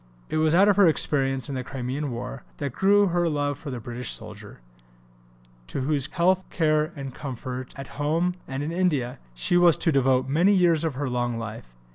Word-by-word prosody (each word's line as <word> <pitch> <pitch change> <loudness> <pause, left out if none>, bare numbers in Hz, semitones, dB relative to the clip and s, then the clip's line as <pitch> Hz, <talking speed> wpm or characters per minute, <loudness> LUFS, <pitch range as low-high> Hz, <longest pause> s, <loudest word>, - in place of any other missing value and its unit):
It - - -1
was 155 +1 +3
out 195 +3 +6
of 205 - +4
her 200 -3 +7
experiences 135 -4 +1
in 140 - -5
the 130 -1 -3
Crimean 135 +3 -4
War 120 +2 -6 0.2
that 140 -4 -4
grew 200 +3 +4
her 175 -1 +1
love 145 -2 -1
for 160 - -7
the 125 -2 -4
British 120 +1 -6
soldier, - - -9 1.1
to 95 - -4
whose 140 0 +1
health, 185 +2 +2
care, 155 -1 +1
and 135 -3 -6
comfort, 130 -1 -6
at 135 - -6 0.2
home 165 +5 +1
and 135 +2 -4
in 155 - -3
India, 155 -9 0 0.2
she 120 - +1
was 175 -3 +5
to 165 - +1
devote 130 -2 +2
many 170 +9 +3
years 170 -4 +3
of 160 -5 -1
her 140 +1 -2
long 120 -1 -1
life. 110 - -8
145 Hz, 195 wpm, -25 LUFS, 130-170 Hz, 1.1 s, her